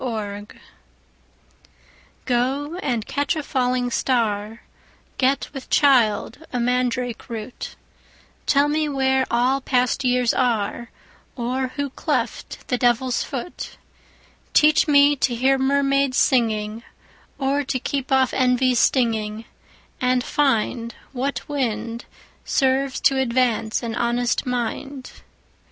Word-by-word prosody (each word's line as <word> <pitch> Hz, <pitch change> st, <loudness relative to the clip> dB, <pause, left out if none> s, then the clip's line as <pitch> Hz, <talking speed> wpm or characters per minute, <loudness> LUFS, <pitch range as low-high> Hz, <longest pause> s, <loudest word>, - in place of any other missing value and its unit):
Song 210 Hz, -4 st, -4 dB, 1.8 s
GO 265 Hz, +5 st, 0 dB
and 240 Hz, -, -1 dB
catch 285 Hz, +1 st, -1 dB
a 310 Hz, -, -3 dB
falling 250 Hz, -2 st, 0 dB
star, 225 Hz, -3 st, -1 dB, 0.6 s
Get 270 Hz, +2 st, +1 dB
with 270 Hz, -3 st, -8 dB
child 255 Hz, -6 st, +3 dB
a 250 Hz, -, -2 dB
mandrake 250 Hz, 0 st, -1 dB
root, 230 Hz, +1 st, -7 dB, 0.7 s
Tell 285 Hz, +1 st, +4 dB
me 305 Hz, 0 st, 0 dB
where 265 Hz, -1 st, +1 dB
all 250 Hz, +3 st, +2 dB
past 255 Hz, 0 st, +1 dB
years 250 Hz, -1 st, +2 dB
are, 235 Hz, -1 st, -1 dB, 0.5 s
Or 255 Hz, +2 st, -2 dB
who 285 Hz, -2 st, -2 dB
cleft -, -, -3 dB
the 250 Hz, -, -1 dB
Devil's 245 Hz, +1 st, +2 dB
foot; 275 Hz, +6 st, -6 dB, 0.8 s
Teach 305 Hz, +1 st, +5 dB
me 285 Hz, 0 st, +5 dB
to 250 Hz, -2 st, 0 dB
hear 265 Hz, +3 st, +2 dB
mermaids 275 Hz, 0 st, +2 dB
singing, 220 Hz, -4 st, +1 dB, 0.6 s
5 270 Hz, -, -2 dB
Or 285 Hz, +1 st, +1 dB
to 260 Hz, -, -1 dB
keep 270 Hz, +1 st, -3 dB
off 265 Hz, -1 st, +3 dB
envy's 250 Hz, -1 st, +2 dB
stinging, 225 Hz, -3 st, +1 dB, 0.6 s
And 250 Hz, 0 st, +2 dB
find 235 Hz, -5 st, 0 dB, 0.2 s
What 270 Hz, +2 st, -3 dB
wind 235 Hz, -5 st, -3 dB, 0.4 s
Serves 270 Hz, 0 st, +1 dB
to 270 Hz, -1 st, +3 dB
advance 240 Hz, -3 st, 0 dB
an 230 Hz, -1 st, -3 dB
honest 240 Hz, +2 st, 0 dB
mind. 250 Hz, +2 st, -4 dB
255 Hz, 115 wpm, -22 LUFS, 235-270 Hz, 1.8 s, Teach